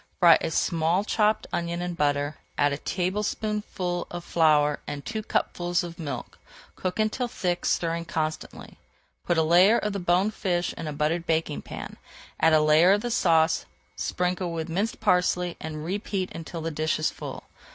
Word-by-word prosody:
Fry 170 -3 +7
a - - -1
small 165 +3 +1
chopped 215 0 +1
onion 170 0 -2
in 175 0 -3
butter, 145 -1 0 0.2
add 145 0 +3
a - - -2
tablespoonful 190 -1 -2
of 175 0 -6
flour 150 -4 +3
and 145 -1 -5
two 220 -1 -3
cupfuls 175 -4 -1
of 170 -1 -8
milk. 150 -4 -6 0.4
Cook 185 -1 -3
until 215 +3 0
thick, 180 -7 -2
stirring 170 0 0
constantly. 155 -2 -4 0.5
Put 175 - +2
a 160 - +4
layer 180 +8 +6
of 210 -1 -2
the 200 - -2
boned 180 +4 +2
fish 180 -4 -1
in 165 - -6
a - - -2
buttered 155 +4 -1
baking 160 -2 0
pan, - - -8 0.4
add 160 - +4
a 155 - +6
layer 155 +5 +6
of 205 - +1
the 240 - -3
sauce, 165 -7 +3 0.3
sprinkle 180 0 -1
with 165 0 -4
minced 200 +8 -2
parsley, 180 -3 +2
and 155 0 -5
repeat 195 0 -2
until 165 0 -6
the 165 +1 -3
dish 155 +1 0
is 155 - 0
full. - - -7
175 Hz, 170 wpm, -26 LUFS, 160-185 Hz, 0.5 s, Fry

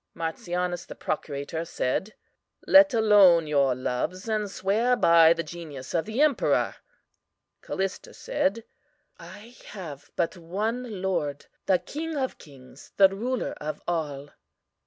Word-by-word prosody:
"MARTIANUS, 175 +2 -3
the - - -9
procurator, 145 +2 -4
said: 170 +6 -2 0.5
Let 290 0 +7
alone 205 -7 +5
your 140 -4 +2
loves, 130 - -3
and 215 -2 -1
swear 215 +6 +1
by 165 -6 +6
the 170 0 -3
genius 155 -5 -9
of 165 - 0
the 220 +6 -2
emperor. 300 -5 +2 0.9
"CALLISTA 190 -1 -4
said: 220 +4 -1 0.6
I 205 +8 -12
have 155 -8 -9
but 170 +1 -1
one 210 +4 -4
Lord, 155 -7 -2 0.2
the 190 - +4
King 320 - -6
of 260 -2 -3
kings, 135 -2 -15
the 195 -1 +7
Ruler 235 +6 -3
of 155 +1 -4
all. 145 -4 -3
180 Hz, 125 wpm, -26 LUFS, 155-215 Hz, 0.9 s, Let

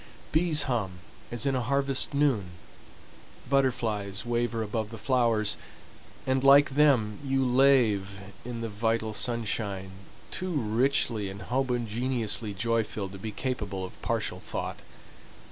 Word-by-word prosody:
Bees 160 -1 +4
hum 115 -8 -1 0.4
as 120 +1 -2
in 135 - +2
a 130 - 0
harvest 135 +2 +1
noon, 140 -10 +1 1.0
butterflies 115 -7 0
waver 120 -1 -1
above 110 0 -3
the 115 - -8
flowers, 115 -3 +1 0.7
and 130 0 +1
like 140 +1 +7
them 130 -8 +3
you 135 -1 +1
lave 120 -7 +3 0.2
in 120 -1 -5
the 115 - -2
vital 110 +1 -1
sunshine, 100 -3 -1 0.4
too 185 -1 -2
richly 115 -4 +1
and 100 +1 -8
homogeneously 120 -3 -1
joy 115 +2 +1
filled 100 -2 -5
to 95 - -9
be 110 - -5
capable 105 -6 -3
of 90 - -12
partial - - -2
thought. - - -5
115 Hz, 130 wpm, -28 LUFS, 105-130 Hz, 1.0 s, like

